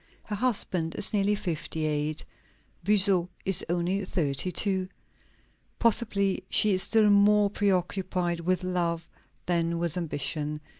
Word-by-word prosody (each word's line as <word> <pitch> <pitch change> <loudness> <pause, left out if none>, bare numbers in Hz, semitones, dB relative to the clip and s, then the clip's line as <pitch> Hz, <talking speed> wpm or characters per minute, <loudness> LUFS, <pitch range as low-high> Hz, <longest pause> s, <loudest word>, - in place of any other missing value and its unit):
Her 210 - -5
husband 195 -8 -1
is - - 0
nearly 205 0 +2
fifty 160 -4 -4
eight; 150 0 -2 0.6
Buzot 190 -2 +3 0.2
is 195 -2 +2
only 175 +3 -1
thirty 165 -2 -1
two. 190 0 +1 0.9
Possibly 210 -4 +1
she 210 -2 +3
is 185 - +3
still 215 +2 +4
more 205 0 +4
preoccupied 185 -3 -1
with 185 +2 -1
love 170 -2 -2 0.4
than 170 -1 0
with 170 0 -1
ambition. 150 -2 -3
185 Hz, 120 wpm, -27 LUFS, 170-200 Hz, 0.9 s, still